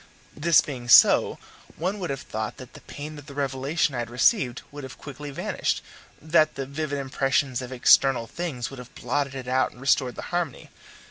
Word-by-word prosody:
This 165 +2 +5
being 125 -4 -7
so, - - +7 0.4
one 185 +6 -2
would 180 - -4
have 135 -1 -3
thought 110 0 -5
that 130 - -12
the - - -13
pain 150 +1 -8
of 145 - -14
the 140 - -10
revelation 140 +2 -1
I 120 - -3
had 120 -1 -4
received 125 - +2
would 145 0 -9
have 130 -1 -9
quickly 145 +1 -8
vanished 140 - -2 0.4
that 155 0 +2
the 135 - -4
vivid 145 +1 -3
impressions 135 -1 0
of 125 0 -7
external 130 -1 +4
things 140 -4 -5
would 135 - -9
have 125 0 -12
blotted 140 -2 -2
it 130 -2 -6
out 130 +1 +2
and - - -17
restored 130 -1 +1
the - - -7
harmony. 175 -7 -3
135 Hz, 195 wpm, -25 LUFS, 125-150 Hz, 0.4 s, so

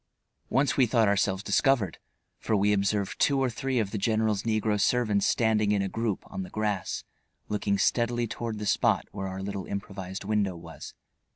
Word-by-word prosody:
Once 135 +3 +2
we 130 -3 +5
thought 115 -2 +3
ourselves 100 -1 +1
discovered, 105 - +2 0.4
for 110 - 0
we 105 +1 +3
observed 100 0 0
two 140 -1 +3
or 130 -2 +1
three 135 +2 -2
of 105 -4 0
the 105 - -2
general's 110 -1 +1
negro 110 -2 0
servants 110 -3 +2
standing 110 -3 +2
in 100 -1 +2
a - - -1
group 115 0 -2
on - - -6
the 90 - -6
grass 105 -3 -2 0.5
looking 100 -1 0
steadily 120 +2 +1
toward 115 0 -4
the 105 - -4
spot - - +2
where 95 -2 -4
our 95 0 -5
little 100 -1 -4
improvised 95 -1 -5
window 100 -2 0
was. 85 -1 -10
105 Hz, 180 wpm, -28 LUFS, 100-115 Hz, 0.5 s, we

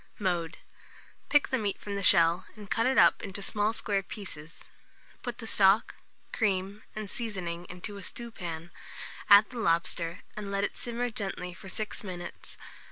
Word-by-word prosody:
Mode. 175 -3 -1 0.7
Pick 290 0 +4
the 260 - +1
meat 205 -2 -1
from 205 - -6
the 200 - -2
shell, 170 0 +6
and 210 -2 -11
cut 230 +2 +2
it 265 - +2
up - - +6
into 200 0 -6
small 210 +2 +1
square 205 -3 0
pieces; 165 -6 -9 0.6
put 245 -1 -5
the 230 - -8
stock, 200 0 +4 0.4
cream, 200 -1 0
and 215 -1 -4
seasoning 185 -6 -4
into 185 +4 -6
a - - -8
stewpan, 175 -7 -5 0.6
add 205 +3 +8
the 245 - -6
lobster, 170 -3 +1
and 210 -1 -5
let 200 0 0
it - - -1
simmer 240 0 -3
gently 195 -5 -3
for 190 +2 -10
6 215 +3 -3
minutes. 180 -3 -7
200 Hz, 165 wpm, -29 LUFS, 180-215 Hz, 0.7 s, add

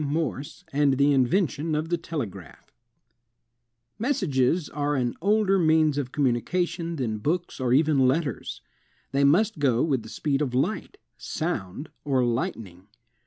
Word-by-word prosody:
MORSE 145 -1 -3
AND 140 -2 +3
THE 140 +1 +4
INVENTION 155 +3 +1
OF 155 +2 -2
THE 175 - +1
TELEGRAPH 150 - -7 1.3
Messages 175 - +1
are 145 0 -1
an 125 -3 0
older 200 0 +3
means 155 -3 +3
of 130 -3 -4
communication 170 +6 -1
than 115 -7 -2
books 165 +9 -2
or 125 -2 0
even 140 -1 +4
letters. 140 - -2 0.5
They 140 +1 +2
must 190 +8 +3
go 130 -4 +2
with 140 -6 +1
the 110 - -11
speed 140 +3 -1
of 130 -4 -1
light, 185 - -1 0.2
sound, 145 - -4
or 130 -4 +1
lightning. 105 -6 -3
145 Hz, 135 wpm, -26 LUFS, 130-165 Hz, 1.3 s, THE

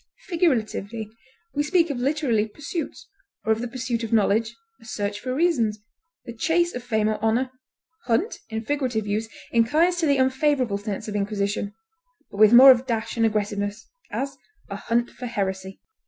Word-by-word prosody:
Figuratively, 230 - -1 0.4
we 290 - 0
speak 330 +1 +2
of 260 - -4
literary 255 -5 +1
pursuits, 300 - -6 0.4
or 220 - +2
of 220 +1 +1
the 245 - -2
pursuit 240 -1 -3
of 225 - -4
knowledge; 220 +1 +2 0.3
a - - -16
search 205 -2 -3
for 255 - -4
reasons; 265 -10 +2 0.5
the 235 - -7
chase 345 +8 +1
of 245 - -5
fame 220 -3 0
or 215 0 -2
honor; 240 +4 +1 0.5
hunt, 290 - 0
in 220 0 -4
figurative 255 -6 -1
use, 215 +2 -2 0.2
inclines 305 +10 +3
to 330 -2 +1
the 280 -1 +3
unfavorable 260 -4 +1
sense 205 +1 -5
of 210 - -5
inquisition, 205 0 -2 0.6
but - - -9
with 215 0 +7
more 260 +3 +10
of 255 0 +2
dash 225 -2 -2
and 225 -1 +3
aggressiveness; 205 0 -2 0.2
as, 275 0 -3 0.4
a - - -3
hunt 235 +4 -1
for 250 - -7
heresy. 190 -3 -3
230 Hz, 170 wpm, -24 LUFS, 215-265 Hz, 0.6 s, more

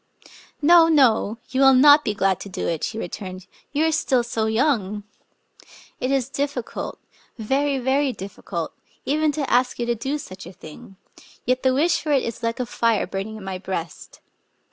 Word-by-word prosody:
" - - -23
No, 335 +1 +7
no 245 -8 +3
— - - -34
you 260 +1 +1
will 270 -1 +7
not 290 +3 +7
be 210 - -2
glad 195 -2 +1
to 200 - -8
do 185 - -4
it," 165 -2 -2
she 220 - -3
returned: 185 -1 -6 0.3
"you 300 +3 +1
are 320 - +2
still 270 -5 +1
so 225 -2 -2
young! 220 -4 0 1.0
It 255 - -1
is 270 -2 +1
diffi 275 -3 -3
cult - - -6 0.3
— - - -38
very, 270 +5 0
very 265 +2 +1
difficult 190 -5 -6 0.2
— - - -32
even 305 +2 +1
to 285 -3 -2
ask 250 +1 +2
you 240 - -2
to 240 - +1
do 265 +6 -3
such 185 - -10
a 180 - -11
thing; 160 +4 -13 0.5
yet 255 +1 +1
the 260 -1 +2
wish 315 +4 +2
for 305 - -3
it 275 -3 +3
is 230 0 -5
like 230 +1 -2
a 250 - -1
fire 230 -2 +1
burning 195 +3 -5
in 210 - -10
my 190 -1 -5
breast. 170 -4 -6
245 Hz, 205 wpm, -23 LUFS, 200-280 Hz, 1.0 s, No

